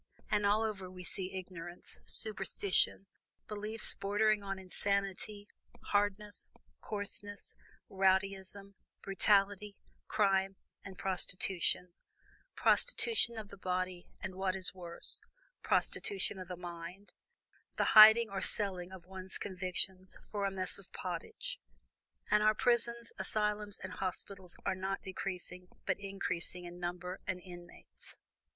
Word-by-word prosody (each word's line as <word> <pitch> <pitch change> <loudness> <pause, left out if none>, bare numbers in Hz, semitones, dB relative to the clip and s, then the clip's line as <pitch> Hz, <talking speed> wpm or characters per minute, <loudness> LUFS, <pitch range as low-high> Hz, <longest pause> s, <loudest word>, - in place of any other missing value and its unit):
And 205 -1 +3
all 210 +2 +4
over 200 -4 -3
we 180 0 -9
see 190 +1 -4
ignorance, 175 -2 -8
superstition, 195 -2 +1 0.4
beliefs 215 +1 0
bordering 210 +1 +2
on 195 -1 -4
insanity, 200 +2 -1 0.4
hardness, 205 0 0 0.3
coarseness, 205 -1 -4 0.3
rowdyism, 195 +1 +1 0.3
brutality, 200 +1 +3 0.3
crime 195 -2 +2 0.3
and 190 -2 -9
prostitution; 180 -1 +1 0.6
prostitution 450 - +3
of 215 -2 -6
the 200 - -11
body, 185 -1 -2
and - - -5
what 190 0 0
is 185 -1 -1
worse, 175 -2 -2 0.4
prostitution 400 - 0
of 185 - -7
the 180 0 -6
mind, 175 +3 -8 0.6
the - - +2
hiding 220 +1 +11
or 195 -2 -4
selling 185 -3 +1
of 185 -3 -10
one's 190 0 -5
convictions 185 0 -2
for 205 -2 -1
a 195 - 0
mess 185 0 -1
of 195 - -17
pottage. 175 -2 -4 0.7
And 210 - +5
our 215 0 +5
prisons, 235 0 +2
asylums, 210 -1 0
and - - -7
hospitals 185 -1 -5
are - - +2
not 190 +1 -3
decreasing, 180 -1 -5 0.2
but - - 0
increasing 185 -3 -3
in 175 0 -9
number 180 +1 -4
and 185 -1 -1
inmates. 175 -1 -12
195 Hz, 120 wpm, -34 LUFS, 185-205 Hz, 0.7 s, hiding